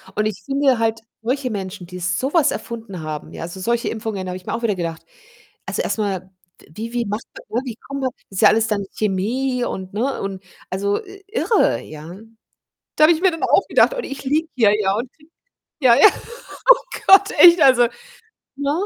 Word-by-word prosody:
Und 210 +1 0
ich 210 -3 -3
finde 275 -3 +2
halt 225 0 0 0.2
solche 255 +3 -1
Menschen, 190 -2 -6
die 180 +1 -9
so 190 - -2
was 310 -4 +4
erfunden 225 -7 -6
haben, 155 -1 -6
ja, - - -7
also, 175 +3 -7
solche 235 +4 -1
Impfungen, 215 -4 -4
da - - -5
habe 180 - -5
ich 185 - -16
mir - - -4
auch 235 - -4
wieder 210 -4 +1
gedacht 165 -2 -5 0.6
also, - - -2
erstmal, 190 -3 -3 0.4
wie 225 +8 -7
wie 240 -1 -1
macht 210 +2 -4 0.3
man 235 - 0
ne, - - -8
wie 235 -3 -5
kommt 275 +3 -7
man 260 - 0 0.2
Ist 195 - -4
ja - - +8
alles 220 +1 +2
dann 205 -2 -1
Chemie 240 +6 -1
und 190 0 -6
ne? 255 +6 -2
Und, 195 -1 -5 0.3
also, 200 +2 -1 0.3
irre, 450 +1 +1
ja? 155 +4 -10 0.8
Da 305 - +5
habe 340 - +6
ich 320 - -4
mir 375 -2 +4
dann 325 - -6
auch - - +3
gedacht - - +4
und - - -4
ich 275 - -7
liege 310 +4 +1
hier 215 -4 +4
ja 195 -1 +1
und 240 +4 -4
kriege 305 +1 -25 0.5
ja, 240 -2 +6
ja. 295 - +8 0.6
Oh - - +4 0.2
Gott, 395 +1 +7
echt, 345 -1 +8
also, 245 -3 +6 0.7
ne? 285 0 -1
225 Hz, 205 wpm, -20 LUFS, 190-270 Hz, 0.8 s, ja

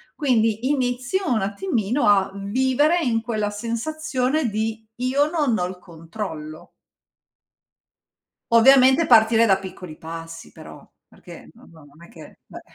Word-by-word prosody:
Quindi 230 -4 0
inizio 255 +6 -1
un 220 -4 +1
attimino 200 +5 -1
a 195 -2 +3
vivere 260 - +1
in 230 -5 0
quella 215 -3 -3
sensazione 255 +4 -2
di: 220 +1 -4
io 270 +4 0
non 295 -9 0
ho 180 - -1
il 185 0 -7
controllo. 165 -2 -9 1.8
Ovviamente 265 +5 +5
partire 225 -1 +5
da 195 -2 +2
piccoli 185 -4 -10
passi 165 0 -9
però, - - -13 0.2
perché - - -15
non - - -20
non 155 0 -19
è - - -17
che, 230 - -15
beh - - -11
225 Hz, 125 wpm, -22 LUFS, 195-260 Hz, 1.8 s, Ovviamente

